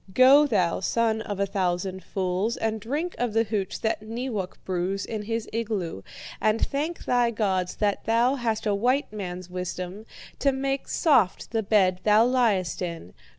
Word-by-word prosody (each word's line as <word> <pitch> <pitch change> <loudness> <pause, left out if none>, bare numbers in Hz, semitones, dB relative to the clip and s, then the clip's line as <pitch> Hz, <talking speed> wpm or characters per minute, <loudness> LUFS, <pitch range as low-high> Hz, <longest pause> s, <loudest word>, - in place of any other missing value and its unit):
Go, 275 +4 +7
thou 185 -9 +1
son 220 +3 +1
of 205 -3 -5
a 200 - +2
thousand 185 -1 -2
fools, 190 +4 -1
and 220 -1 -2
drink 295 - -2
of 240 -3 -1
the 225 0 +3
hooch 205 -4 -3
that 220 -1 0
Neewak 220 -3 -4
brews 185 +2 -1
in 220 -2 -4
his 225 +1 -3
igloo, 210 - -2 0.4
and 215 +1 +2
thank 305 +5 -2
thy 245 -1 +3
gods 190 -5 -1
that 205 -2 -1
thou 235 +3 +3
hast 230 -5 -2
a 210 - +2
white 245 +5 +1
man's 180 -3 -5
wisdom 180 +3 -5 0.3
to 280 - +3
make 270 +1 -2
soft 250 - +2
the 225 -1 +1
bed 195 -3 +3
thou 215 +2 +5
liest 220 - +1
in. 170 - -5
215 Hz, 165 wpm, -26 LUFS, 185-235 Hz, 0.4 s, Go